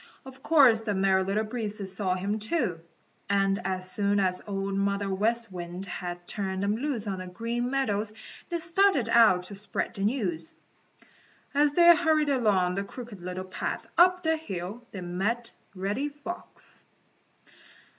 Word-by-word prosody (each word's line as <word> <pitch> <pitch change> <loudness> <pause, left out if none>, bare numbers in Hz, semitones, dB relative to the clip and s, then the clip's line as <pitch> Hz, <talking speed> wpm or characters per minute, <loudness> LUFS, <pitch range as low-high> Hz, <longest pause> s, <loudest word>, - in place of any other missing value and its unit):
Of 265 0 -12
course 265 -9 +5
the 210 -3 -2
Merry 190 0 +3
Little 200 +3 0
Breezes 210 -4 -4
saw 190 -2 0
him, 200 +4 -2
too, 215 - 0 0.5
and 195 +1 +2
as 185 -1 -3
soon 205 0 +1
as 185 -2 0
Old 195 -1 -2
Mother 200 0 0
West 225 +2 0
Wind 175 +1 -6
had 175 -2 -6
turned 190 -1 -3
them 205 +1 +1
loose 245 -3 -2
on 195 -2 -3
the 185 - -6
Green 235 +6 -3
Meadows 220 -6 0 0.4
they 345 - -1
started 340 - +2
out 220 -6 +6
to 185 - -5
spread 200 +1 -3
the 200 - -7
news. 195 -8 -1 1.0
As 290 0 +3
they 345 +1 +8
hurried 315 -3 +2
along 205 -9 +2
the 200 +2 -2
Crooked 220 -2 -9
Little 180 +1 -5
Path 185 - -4
up 360 +1 +5
the 320 0 +2
hill, 210 - -6
they 195 - -7
met 200 +7 -2 0.2
Reddy 205 +10 -2
Fox. 295 +5 -10
205 Hz, 155 wpm, -28 LUFS, 190-250 Hz, 1.0 s, they